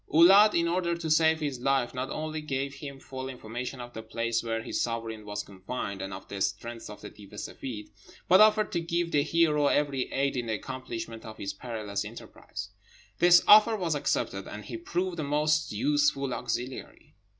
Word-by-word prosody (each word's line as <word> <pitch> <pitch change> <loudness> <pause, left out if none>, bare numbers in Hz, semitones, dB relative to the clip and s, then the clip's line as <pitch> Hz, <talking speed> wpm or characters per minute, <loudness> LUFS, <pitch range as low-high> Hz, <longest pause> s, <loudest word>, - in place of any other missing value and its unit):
Oulâd, 195 +7 +7
in 170 0 +2
order 170 0 0
to 165 -2 -3
save 160 0 +4
his 140 -4 -2
life, 135 -1 +1
not 130 +1 -3
only 155 0 -4
gave 140 -2 -3
him 140 -1 -8
full 130 0 -7
information 125 +1 -6
of 120 0 -8
the 110 - -6
place 115 +1 -1
where 115 -1 -3
his - - -2
sovereign 115 -2 -3
was 105 0 -3
confined, 100 +1 -6
and 95 - -5
of - - -8
the 100 -1 -6
strength 115 +5 -3
of 105 - -10
the - - -8
Deev 100 -2 -15
e - - -10
Seffeed, 110 -6 -6 0.4
but 185 +3 +7
offered 215 0 +5
to 175 - 0
give 170 0 -1
the 145 - +3
hero 150 -1 +3
every 140 -3 +1
aid 140 0 0
in 120 -2 -2
the 110 - -1
accomplishment 115 -1 -6
of 110 -1 -9
his 100 - -4
perilous 105 -2 -4
enterprise. - - -8 0.5
This 175 0 +7
offer 215 +2 +8
was 175 -6 -1
accepted, 100 -9 -1
and 105 0 -8
he 120 - -6
proved 175 +9 -2
a - - -1
most 150 +1 +1
useful 140 +3 +1
auxiliary. 125 +2 -5
135 Hz, 195 wpm, -28 LUFS, 115-160 Hz, 0.5 s, offer